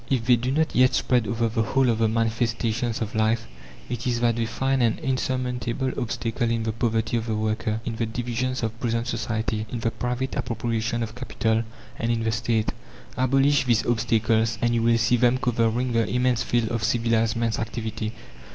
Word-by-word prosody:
If 125 -4 +1
they 125 -1 +6
do 120 +2 -2
not 155 +3 +1
yet 130 +1 +5
spread 125 -4 +2
over 115 +2 0
the 115 +1 0
whole 130 +4 +2
of 115 -2 +1
the 115 - +3
manifestations 115 +1 0
of 110 - -6
life, 110 +1 +1 0.4
it 120 +1 -4
is 120 -1 +1
that 120 -1 +3
they 115 -1 -1
find 135 +3 0
an 115 -2 +2
insurmountable 130 -2 -1
obstacle 120 -1 -2
in 115 -1 0
the 110 - -1
poverty 115 0 0
of 115 0 -3
the 110 - 0
worker, 110 0 -1
in 115 -2 -3
the 115 - -1
divisions 120 +2 -2
of 115 0 -3
present 115 -1 -1
society, 110 -2 -2
in 120 0 -4
the 115 - 0
private 125 +2 -3
appropriation 115 -1 -1
of 110 0 -5
capital, 115 -2 0 0.4
and 115 +1 0
in 115 -1 0
the 110 - +1
State. 110 0 0 0.4
Abolish 135 +2 +3
these 120 -2 +2
obstacles, 115 -1 +1
and 120 0 +1
you 115 - +2
will 115 0 +4
see 120 +2 +3
them 125 +1 +3
covering 120 0 0
the 115 -2 +1
immense 125 -1 +1
field 120 -3 0
of 115 -2 -2
civilized 115 0 +1
man's 115 -1 0
activity. 110 -1 -3
115 Hz, 195 wpm, -25 LUFS, 110-125 Hz, 0.4 s, they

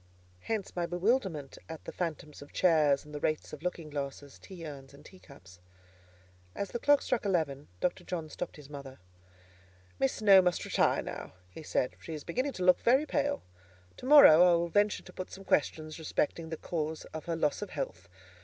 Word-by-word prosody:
Hence 215 - -4
my 175 -1 -1
bewilderment 175 - -1
at 160 -1 -8
the - - -6
phantoms 155 -4 -5
of 145 - -12
chairs, 150 -6 +3
and 150 - -13
the 150 - -4
wraiths 155 +1 -2
of 150 - -8
looking 170 -3 -4
glasses, 140 -1 -6
tea 180 -4 -10
urns, 140 -2 -9
and - - -17
teacups. 115 - -16 1.0
As 200 - -4
the 240 - -3
clock 290 +2 +4
struck 250 - -1
eleven, 160 -8 -1
Dr. 175 - -1
John 165 -3 -4
stopped 170 +3 -6
his 150 -2 -12
mother. 140 -2 -9 1.0
"Miss 135 - +2
Snowe 200 -3 +7
must 180 -1 0
retire - - +2
now," - - -7 0.2
he 160 - -10
said; 130 -4 -1
"she 160 - -6
is 150 - -7
beginning 255 +10 -2
to 185 - -4
look 180 - +6
very 265 +5 +3
pale. 285 -1 -1 0.5
To 255 - -8
morrow 275 - +9
I 180 -1 +7
will 170 0 0
venture 205 +3 +2
to - - -14
put 185 - -6
some 195 - -10
questions 155 0 0
respecting 160 +1 -2
the 160 - -4
cause 160 -1 -4
of 160 -1 -6
her 170 - -2
loss 150 0 0
of 205 - -5
health. 90 - -5
165 Hz, 190 wpm, -31 LUFS, 150-190 Hz, 1.0 s, morrow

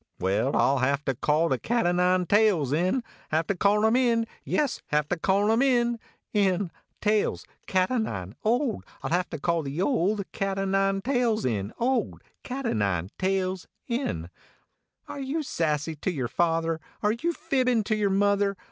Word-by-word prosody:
Well, 100 +9 +1
I - - +4
ll 140 - +1
have 140 +3 0
to 135 - +1
call 150 +6 +1
the 130 -5 0
cat 235 -2 0
o 175 - +3
nine 180 +1 +2
tails 195 - +3
in 185 - +1 0.3
Have 160 +1 +1
to 200 - -1
call 205 +3 +3
him 220 +2 +4
in; 235 -3 +3 0.2
yes, 290 -4 0
have 150 0 +1
to - - +1
call 195 +5 +2
him 225 +2 +3
in; 240 -3 +2 0.3
in. 195 -3 +1 0.3
tails 210 0 +1 0.2
cat 185 +2 +1
o 255 - +1
nine 100 - -4
old 240 +2 +1 0.2
I - - -2
ll - - -9
have 180 +2 +1
to 160 - -5
call 170 +3 0
the 140 +2 -5
old 200 -2 +1
cat 195 -1 -2
o 195 - 0
nine 195 0 +1
tails 245 -4 +1
in. 105 -4 -1
old 255 +2 -1 0.2
cat 265 +1 -5
o - - +1
nine 100 -4 -1
tails 190 -1 -1 1.4
Are - - -7
you 280 +4 -2
sassy 160 - -1
to 170 - -2
yer 135 -8 -2
father, 165 +3 0 0.2
are 210 - +3
you 240 +10 -1
fibbin 260 -8 +1
to 215 - 0
yer 210 -2 +1
mother 200 0 +2
195 Hz, 185 wpm, -26 LUFS, 160-225 Hz, 1.4 s, I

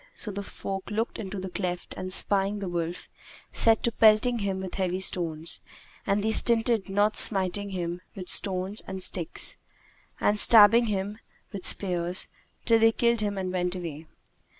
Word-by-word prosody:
So 215 - -3
the 200 +1 -6
folk 195 -1 -7
looked 220 +3 -3
into 200 -2 -6
the 185 0 -7
cleft 180 -2 -5
and, 185 0 -7
spying 200 +1 +2
the 200 -2 -6
wolf, 170 0 -5 0.5
set 225 -1 +4
to 235 - 0
pelting 225 +2 +3
him 195 -2 -3
with 190 -1 -7
heavy 185 -1 -2
stones, 165 -4 -2 0.5
and 200 +1 0
they 220 - 0
stinted 225 -1 +1
not 205 +2 +1
smiting 200 0 +4
him 175 -2 -5
with 185 -2 -8
stones 190 +2 +1
and 190 -1 -6
sticks, 175 -3 -1 0.6
and 210 0 +1
stabbing 230 +2 +6
him 205 +1 -4 0.3
with 195 -3 -1
spears, 180 -2 +3 0.4
till 230 -1 +3
they 225 0 +4
killed 235 0 0
him 205 -1 -3
and 185 -1 -4
went 180 0 -2
away. 165 -3 -8
195 Hz, 165 wpm, -26 LUFS, 180-215 Hz, 0.6 s, stabbing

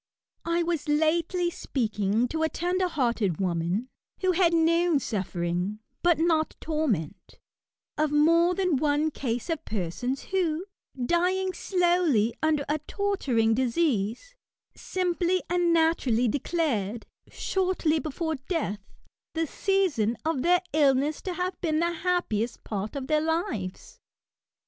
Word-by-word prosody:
I 340 0 +2
was 330 -3 -2
lately 335 +3 +1
speaking 220 - 0
to 320 - -2
a 320 - +2
tender 360 +3 0
hearted 235 - 0
woman, 180 +5 -1 0.3
who 370 -1 +3
had 350 -1 +3
known 335 0 +3
suffering, 185 -4 -2 0.2
but 345 -2 +4
not 320 -1 +1
torment, 215 - -2 0.6
of 305 -1 +2
more 335 +4 +4
than 365 -6 +1
one 295 +2 +1
case 245 -4 -3
of 325 -4 -2
persons 220 +7 -3
who, 355 -2 -1 0.4
dying 365 +5 +1
slowly 345 - +2
under 305 -2 +1
a 300 +1 0
torturing 270 - +1
disease, 255 - 0 0.4
simply 365 0 0
and 350 -1 +2
naturally 320 -8 +2
declared, 240 - -1 0.2
shortly 365 -4 0
before 320 +1 -3
death, 315 - -1 0.6
the 325 0 +1
season 305 - 0
of 315 -5 0
their 355 +3 +3
illness 290 0 +2
to 370 -2 -4
have 360 +1 -3
been 315 -3 +1
the 340 +1 +1
happiest 340 - -1
part 210 +4 -4
of 275 -2 -3
their 305 +1 +2
lives. 315 - -3
315 Hz, 125 wpm, -27 LUFS, 235-345 Hz, 0.6 s, but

